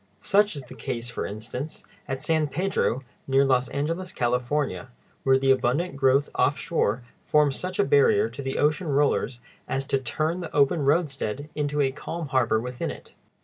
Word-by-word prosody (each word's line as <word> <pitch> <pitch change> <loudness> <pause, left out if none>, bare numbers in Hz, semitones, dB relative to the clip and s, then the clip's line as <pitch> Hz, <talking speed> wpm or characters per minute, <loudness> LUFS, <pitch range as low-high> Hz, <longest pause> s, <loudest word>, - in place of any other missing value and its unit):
Such 205 -2 +3
is 140 - -6
the 125 - -12
case, 120 +1 -4
for - - -3
instance, 120 +8 -6 0.2
at 135 +1 -3
San 155 -1 +2
Pedro, 145 -5 0 0.2
near 135 +1 +4
Los 130 -2 +2
Angeles, 165 +8 -3
California, 125 -3 -1 0.3
where 135 0 +4
the 135 0 +3
abundant 135 +6 +1
growth 135 +1 +3
offshore 140 - +1 0.2
forms 150 -3 +3
such 185 +4 -4
a 205 - +4
barrier 435 -1 +4
to 140 - -8
the 135 -1 -3
ocean 150 +4 +1
rollers 140 -3 +1 0.3
as 135 0 -1
to 135 - +1
turn 155 +6 -1
the 165 -3 -6
open 145 +3 +3
roadstead 145 -3 0
into 145 0 0
a 135 -1 +2
calm 160 +2 -6
harbor 120 -4 +2
within 125 +1 -4
it. - - -9
140 Hz, 170 wpm, -26 LUFS, 130-160 Hz, 0.3 s, near